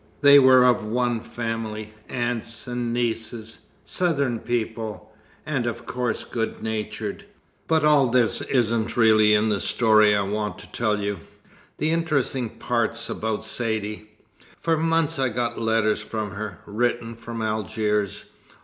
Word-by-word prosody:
They 140 -1 +9
were 130 -1 +7
of 125 -3 +3
one 120 +2 0
family, 110 -2 -5 0.2
aunts 120 -1 -3
and 120 -1 -3
nieces 115 -1 -3 0.2
Southern 140 -9 0
people, 110 -2 -4 0.3
and 135 -6 -1
of 120 0 -4
course 125 -2 -2
good 115 -2 -4
natured. 110 -1 -4 0.4
But 160 -2 +3
all 145 -3 +5
this 120 -2 +2
isn't 115 -3 0
really 110 -2 +5
in 105 +1 +2
the 100 -2 0
story 110 -2 +4
I 100 - +2
want 105 -1 -3
to 105 - -13
tell 105 -3 0
you. 100 -2 -2 0.6
The 155 +2 +1
interesting 140 -7 0
part's 115 0 -2
about 110 -1 -2
Saidee. 110 -2 -2 0.5
For 165 -1 +1
months 165 -2 +1
I 130 -1 +2
got 120 +1 -2
letters 110 -1 +1
from 105 -1 -4
her, 100 -3 -6
written 115 +2 -1
from 115 0 -6
Algiers. 105 -1 -1
115 Hz, 140 wpm, -24 LUFS, 110-125 Hz, 0.6 s, They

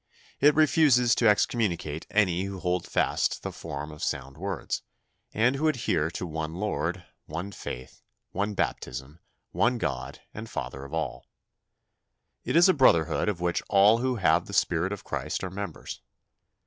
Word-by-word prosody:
It 145 +1 +5
refuses 145 -6 +5
to 115 - +3
excommunicate 90 -8 0
any 95 -3 +2
who 100 0 -5
hold 90 -1 -1
fast - - 0
the - - -3
form 75 +2 -6
of 75 - -9
sound 70 0 -3
words, 95 +3 -3 0.5
and 120 +5 +2
who 155 +3 +1
adhere 90 - +1
to 90 - -5
one 80 -1 -4
Lord, 90 -2 -2 0.2
one 85 +6 -5
faith, 65 -9 -8 0.3
one 100 +2 -2
baptism, 70 -1 -3 0.3
one 120 +2 +2
God 70 - -3
and 110 +1 -7
Father 65 +1 -5
of 70 - -11
all. 80 - -4 1.2
It - - -2
is 170 +2 +7
a 185 - +5
brotherhood 85 - +3
of 90 -4 -3
which 85 -1 0
all 105 +3 +6
who 130 +1 0
have 95 -7 +2
the - - -8
spirit 90 +2 +1
of 105 - -5
Christ - - -3
are 95 - -4
members. 100 +1 -6
95 Hz, 160 wpm, -27 LUFS, 80-115 Hz, 1.2 s, is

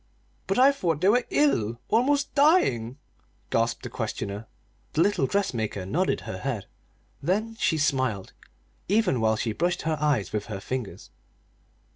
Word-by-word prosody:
"But 195 - 0
I 265 +2 +7
thought 170 - -1
they 185 +4 +3
were 245 +3 +3
ill 120 - +1
almost 280 +5 +2
dying!" 215 - +3 0.5
gasped 115 +1 0
the - - -5
questioner. 100 +3 -4 0.5
The 155 - +2
little 195 -8 +2
dressmaker 115 - -1
nodded 175 - 0
her 95 - -6
head. 120 -6 -3 0.6
Then 215 +8 -1
she 160 - +2
smiled, 130 -9 0 0.5
even 195 - +2
while 110 0 +3
she 110 0 -2
brushed 175 +7 -1
her 155 -1 -1
eyes 145 -11 +1
with 105 -1 -2
her 105 -3 -5
fingers. 125 +1 -6
145 Hz, 145 wpm, -26 LUFS, -, 0.6 s, I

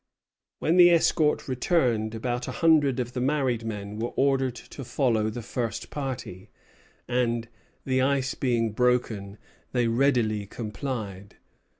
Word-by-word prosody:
When 165 +3 +1
the 175 -1 +9
escort 160 -2 +2
returned, 125 - +1
about 120 +2 -3
a - - -3
hundred 155 -6 +3
of 125 0 -3
the 125 - -2
married 130 -4 0
men 105 -1 -5
were 120 +2 -1
ordered 135 -2 +2
to 135 - -9
follow 120 -4 +1
the 115 +2 -6
first 115 -2 -4
party; 130 -10 -5 0.6
and, 120 -2 0 0.4
"the 130 -1 +1
ice 135 -1 +1
being 115 -4 0
broken," 110 -4 0 0.4
they 120 -2 +2
readily 115 -4 +1
complied. 105 -3 -5
125 Hz, 130 wpm, -26 LUFS, 110-135 Hz, 0.6 s, the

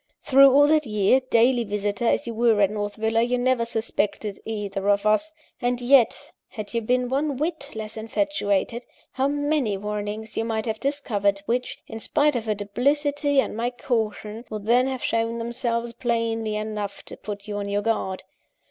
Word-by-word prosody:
"Through 275 0 +7
all 285 +2 +6
that 305 -2 +3
year, 210 +4 +3
daily 240 +1 +4
visitor 205 +1 -2
as - - +2
you 235 - -4
were 225 -1 +3
at 200 -1 +4
North 205 -1 -3
Villa, 225 +1 +1
you 245 +1 +1
never 250 -1 +1
suspected 215 -2 -2
either 205 -2 -3
of 200 0 +2
us! 215 +10 +2 0.3
And 245 0 0
yet, 245 -1 +3 0.2
had 215 -2 -8
you 230 - 0
been 250 +2 +1
one 275 +2 -1
whit 305 -2 -3
less 220 0 -5
infatuated, 230 -2 -1 0.3
how 265 +1 0
many 290 -7 0
warnings 210 +2 -5
you - - 0
might 225 -1 -2
have 220 -2 -2
discovered, 205 -8 0
which, 245 +3 -1
in 225 - -8
spite 290 +5 +2
of 235 -2 -2
her 215 - +1
duplicity 285 +7 +1
and 265 - 0
my 235 +2 0
caution, 225 -3 -3
would 215 -2 -6
then 245 +3 +4
have 260 -1 -4
shown 230 0 0
themselves 235 0 -2
plainly 230 -2 -1
enough 210 -1 -4
to - - -9
put 205 0 -7
you 205 -1 -4
on 200 0 -3
your 205 +1 0
guard! 195 -4 -1
230 Hz, 180 wpm, -24 LUFS, 210-255 Hz, 0.3 s, Through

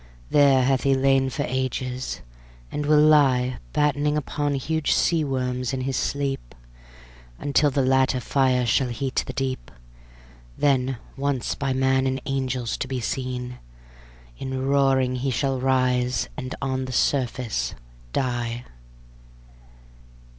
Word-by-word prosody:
There 140 -3 +5
hath 130 0 +2
he 135 -1 +3
lain 135 0 +3
for - - -2
ages, 130 0 -3 0.5
and 150 -1 -3
will 150 0 +5
lie 130 -5 +4
Battening 150 0 +1
upon 145 0 -1
huge 155 +3 0
sea 165 -2 +2
worms 125 -2 -2
in 130 - -2
his 135 0 -2
sleep, 135 - -2 0.8
Until 145 +1 +2
the 135 0 +1
latter 130 0 +3
fire 130 -1 +2
shall 125 +3 +2
heat 130 +2 -1
the - - -3
deep; 135 -1 -3 0.9
Then 135 -2 +2 0.2
once 140 -2 -1
by 135 -2 -2
man 130 0 +2
and 130 0 -1
angels 130 -3 -2
to - - -3
be 130 -1 -3
seen, 125 0 -4 0.8
In 130 0 -3
roaring 135 -2 +2
he 135 +2 -1
shall 135 +1 0
rise 125 -1 +1
and 130 -3 -5
on 130 -1 -1
the 130 - -6
surface 125 - 0 0.4
die. 120 - -2
130 Hz, 130 wpm, -24 LUFS, 125-140 Hz, 0.9 s, There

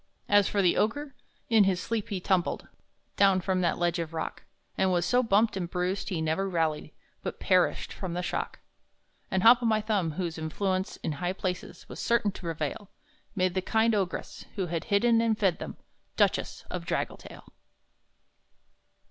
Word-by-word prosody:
As 205 -1 +5
for 200 -1 +1
the 175 - +3
Ogre, 275 +6 0 0.3
in 220 -3 +5
his 190 -2 +1
sleep 225 0 -3
he 195 - -2
tumbled 180 -1 0 0.5
Down 195 -2 +5
from 185 0 0
that 175 - +1
ledge 175 0 0
of 165 -1 -4
rock, 160 - -4 0.3
And 190 - +2
was 175 -1 +1
so 245 +7 +3
bumped 220 -1 +3
and 180 -3 -3
bruised 180 +2 -2
he 165 -4 -2
never 160 +5 0
rallied, 160 -4 -1 0.3
But - - -5
perished 185 -2 +2
from 180 -3 -5
the 180 - -2
shock. - - -3 0.7
And 190 -1 0
Hop 240 +2 +8
o' - - -1
my 220 -1 +3
Thumb, 205 -7 0
whose 170 -2 -3
influence 185 +4 -2
in - - -1
high 175 +5 -2
places 185 -1 -5
Was - - -9
certain 235 -3 +2
to - - -11
prevail, 165 +3 -4 0.5
Made 185 -2 +1
the 185 - 0
kind 220 +4 +2
Ogress, 195 -4 -3
who 195 -3 -1
had 170 -1 -3
hidden 230 +2 +3
and 225 -2 +1
fed 190 -6 +1
them, - - -7 0.4
Duchess - - +1
of - - -4
Draggletail. - - -4
190 Hz, 175 wpm, -28 LUFS, 175-210 Hz, 0.7 s, Hop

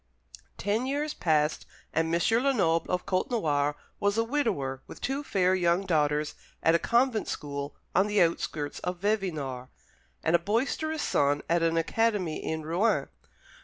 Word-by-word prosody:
Ten 220 +5 0
years 295 +2 -1
passed, 155 -2 +1 0.3
and 160 +1 +1
M. 170 - +2 0.2
Lenoble 190 -12 +2
of 180 0 -1
Côtenoir 155 - 0 0.2
was 205 +1 +1
a 225 - +3
widower 210 - -1
with - - -10
two 275 +2 -2
fair 185 -7 +2
young 180 +1 +2
daughters 150 -3 +1 0.3
at 165 - +5
a 170 - +4
convent 235 +1 +2
school 140 -1 -4 0.2
on 190 +3 +3
the 210 -1 +1
outskirts 160 -4 0
of 180 0 -3
Vevinord, 155 -12 -1 0.6
and 165 - +3
a - - +5
boisterous 280 - -1
son 145 +1 +1
at 170 0 +2
an 165 0 +2
academy 190 -1 0
in 160 0 -3
Rouen. 175 +8 +1
175 Hz, 150 wpm, -28 LUFS, 155-220 Hz, 0.6 s, at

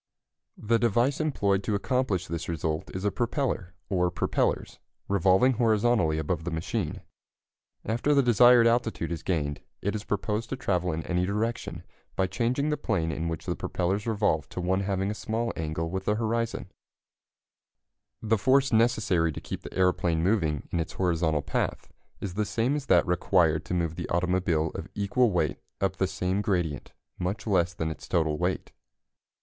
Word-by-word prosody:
The 115 +2 +1
device 120 +4 +2
employed 100 -11 +1
to 105 - 0
accomplish 105 -4 0
this 85 0 -4
result 80 0 -2
is 95 +2 -3
a 105 - +2
propeller, 120 - -2
or 90 -2 +1
propellers, 90 - -1 0.3
revolving 100 +6 +4
horizontally 110 -7 +2
above 80 +1 -2
the 90 - -2
machine. 80 -1 -3 0.8
After 120 +7 +1
the 140 - +5
desired 120 0 +6
altitude 115 -7 +1
is 85 - -3
gained 75 -6 -2 0.2
it 100 - -2
is 105 -1 -4
proposed 105 +3 -2
to - - -2
travel 90 -8 0
in 80 +1 -3
any 90 0 0
direction 110 +4 -2 0.3
by 95 - +2
changing 120 +10 0
the 150 - 0
plane 80 - -1
in 80 +2 -3
which 80 -1 -4
the - - -1
propellers 95 +5 -2
revolve 100 -10 +1
to - - -6
one 90 +2 +1
having 100 0 -1
a - - -2
small 110 +2 -2
angle 80 +1 -3
with 95 0 -3
the 105 - +2
horizon. 115 +1 -2 1.5
[Illustration: 110 - -5
The 110 - +4
force 130 +5 +3
necessary 105 -7 +3
to - - -6
keep - - -6
the - - -9
aeroplane 90 -3 +2
moving 85 -7 +1
in 85 - 0
its 80 - -3
horizontal 80 -5 +1
path - - -2 0.3
is 95 -3 -5
the 105 +2 0
same 120 +7 0
as 145 -2 -4
that 90 -2 +5
required 85 -2 +2
to 90 - -2
move 85 -3 0
the - - -4
automobile 85 -2 +1
of - - -6
equal 110 +5 +2
weight 90 -4 0 0.2
up - - 0
the - - +1
same 95 +2 -1
gradient 85 - -1 0.3
much 90 +4 -3
less 90 -5 +1
than 80 -2 -2
its - - -9
total 80 -3 +1
weight. 90 +1 -1
95 Hz, 175 wpm, -27 LUFS, 85-115 Hz, 1.5 s, desired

